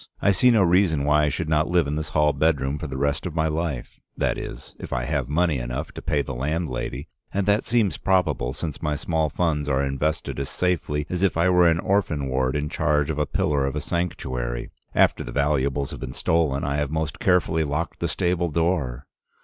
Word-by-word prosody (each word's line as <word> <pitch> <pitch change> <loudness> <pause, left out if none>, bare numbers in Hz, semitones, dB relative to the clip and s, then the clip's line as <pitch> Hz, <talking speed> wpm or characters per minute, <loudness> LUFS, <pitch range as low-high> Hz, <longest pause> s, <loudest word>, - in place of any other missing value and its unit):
I 100 - +3
see 110 +7 +4
no 110 -5 +5
reason 85 -4 +3
why 75 +1 +4
I - - +2
should 75 +3 -3
not 80 0 +2
live 90 -2 +3
in 70 +1 -2
this 75 0 -3
hall 75 -1 +3
bedroom 70 -1 +1
for 75 - -4
the 65 -2 -5
rest 70 +5 0
of 85 - -7
my 80 -1 +2
life, 80 -5 -3 0.2
that - - +1
is, - - -8
if - - -8
I 65 - -1
have 70 -1 -1
money 80 -2 +1
enough - - -4
to - - -8
pay 70 -1 0
the - - -5
landlady, 70 0 -3 0.2
and 100 0 0
that 105 +2 +2
seems 115 -5 +1
probable, 90 -10 +1
since 75 0 -5
my 75 -2 0
small 80 +1 0
funds 75 -2 0
are 70 0 +2
invested 70 +2 -2
as 70 - -3
safely 80 -5 -1
as 90 -1 -3
if 95 -4 +2
I 85 +2 +3
were 90 -1 +5
an 80 -1 +3
orphan 85 -9 0
ward 65 0 0
in 75 0 -1
charge 75 0 +1
of 75 - -3
a 75 - +1
pillar 70 -2 +1
of 70 - -3
a - - 0
sanctuary. 65 -9 -3 0.2
After - - +3
the - - -7
valuables 70 0 0
have - - -7
been 65 -1 -6
stolen, 80 -4 +1
I 70 +1 -1
have 75 -1 -1
most 80 0 -3
carefully 85 -3 +2
locked 75 +2 -3
the - - 0
stable 90 -1 0
door. 75 -6 -1
75 Hz, 220 wpm, -24 LUFS, 70-85 Hz, 0.2 s, no